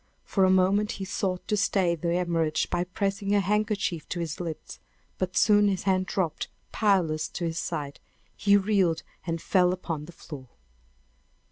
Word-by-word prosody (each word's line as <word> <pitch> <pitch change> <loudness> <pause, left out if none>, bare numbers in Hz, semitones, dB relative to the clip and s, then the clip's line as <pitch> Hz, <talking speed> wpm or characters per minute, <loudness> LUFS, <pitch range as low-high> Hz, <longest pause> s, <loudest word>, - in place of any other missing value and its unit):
For 195 - +1
a - - +4
moment 190 +3 +3
he 195 - -5
sought 185 -1 -2
to 210 - +1
stay 195 -3 +2
the 170 0 -2
hemorrhage 165 -3 0
by 175 - 0
pressing 200 +2 -1
a - - +5
handkerchief 205 -4 -1
to 175 - -3
his 165 -2 -4
lips; 165 -3 -6 0.4
but 185 -1 -2
soon 205 -1 +5
his 195 -2 0
hand 185 -1 +1
dropped 175 -5 -1 0.2
powerless 180 -8 +2
to 175 - -4
his 165 0 -2
side; 145 -4 -4 0.4
he 200 0 +4
reeled 190 -5 +1 0.2
and 165 0 -1
fell 180 +1 +3
upon 165 -5 -4
the 170 - -11
floor! 145 -5 -10
185 Hz, 165 wpm, -27 LUFS, 165-200 Hz, 0.4 s, a